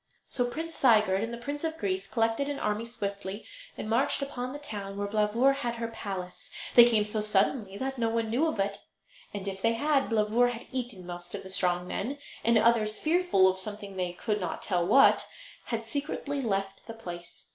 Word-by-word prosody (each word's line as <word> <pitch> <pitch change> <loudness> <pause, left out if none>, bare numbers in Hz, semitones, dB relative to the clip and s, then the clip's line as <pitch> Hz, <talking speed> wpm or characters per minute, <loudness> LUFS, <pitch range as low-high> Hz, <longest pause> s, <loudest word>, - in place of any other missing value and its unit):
So 245 -2 0
Prince 330 +5 -5
Sigurd 215 -8 +4
and 225 +1 -2
the 235 - -5
Prince 285 +5 -5
of 320 0 -2
Greece 195 -3 -2
collected 225 +5 0
an 285 - -2
army 210 +2 -1
swiftly, 200 -3 -5 0.3
and - - -5
marched 245 +5 +2
upon 255 -2 -4
the 290 - -5
town 200 -8 -6
where 205 0 -1
Blauvor 215 +6 +3
had 240 -4 -2
her 230 0 -3
palace. 195 -5 -6 0.2
They 240 - +10
came 215 -3 +3
so 210 0 -1
suddenly 205 0 +1
that 265 +1 -3
no 230 -1 +2
one 225 -1 -1
knew 275 +8 +2
of 315 - -2
it, 200 0 0 0.5
and 200 -1 -5
if 195 -1 -4
they 230 +2 +3
had, 280 +3 +1
Blauvor 225 +2 +3
had 240 -1 -6
eaten 240 -8 -3
most 175 0 -6
of - - -6
the 190 - -7
strong 180 -1 +1
men; 260 +11 -3 0.3
and 230 0 +4
others, 220 -1 +3
fearful 325 - +3
of 190 0 +1
something 205 0 -4
they 180 -1 -2
could 210 +3 -2
not 180 - -4
tell 180 -3 +1
what, 225 +10 +5 0.4
had 230 -1 -2
secretly 285 +3 -3
left 195 -4 -2
the 225 - -7
place. 175 -5 -9
220 Hz, 200 wpm, -29 LUFS, 195-245 Hz, 0.5 s, They